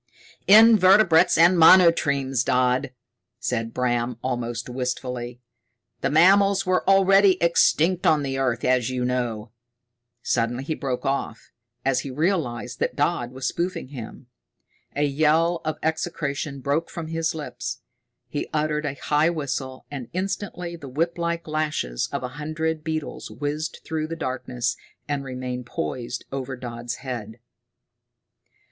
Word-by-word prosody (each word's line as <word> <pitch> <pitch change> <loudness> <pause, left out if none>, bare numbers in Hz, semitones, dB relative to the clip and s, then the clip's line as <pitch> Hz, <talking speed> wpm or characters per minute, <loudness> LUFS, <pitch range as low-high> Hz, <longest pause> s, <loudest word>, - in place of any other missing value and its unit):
"Invertebrates 205 -4 +6
and 170 +2 +5
monotremes, 145 -7 +5
Dodd," 125 0 +1 0.5
said 115 -2 -2
Bram, 120 -1 -1
almost 120 -2 -3
wistfully. 125 -1 -4 0.6
"The - - 0
mammals 195 +5 +5
were 185 0 +1
already 195 0 +5
existent 170 +1 +3
on 150 -2 +3
the 135 -1 -3
earth, 125 -3 0
as 125 -2 +2
you 125 -1 -2
know 120 -3 -2 0.4
" 120 0 -56 0.3
Suddenly 120 +2 0
he 155 - -2
broke 135 -3 -4
off, 135 -4 -3 0.3
as 135 -1 +2
he 140 - -5
realized 135 - -2
that - - -1
Dodd 145 -5 0
was 130 0 -6
spoofing 175 -5 -3
him. 125 -2 -9 0.7
A 145 - +1
yell 155 +4 +2
of 155 0 -2
execration 150 -3 -2
broke 145 +5 -1
from 165 - -6
his 165 0 -1
lips. 155 - -6 0.5
He - - -4
uttered 150 0 -1
a 140 - -3
high 150 +3 +1
whistle, 135 -5 -4
and 135 -5 -6
instantly 185 -2 -4
the 145 -5 -10
whiplike 170 +4 -2
lashes 150 - -2
of - - -3
a 125 - -3
hundred 155 +1 -2
beetles 155 -2 -4
whizzed 150 +2 -4
through 155 -1 -2
the 165 - -5
darkness 125 -4 -3 0.3
and 145 -1 -2
remained 125 -1 -5
poised 120 +7 -4
over 135 -1 -4
Dodd's 120 -1 -6
head. 115 -3 -5
140 Hz, 135 wpm, -24 LUFS, 125-165 Hz, 0.7 s, Invertebrates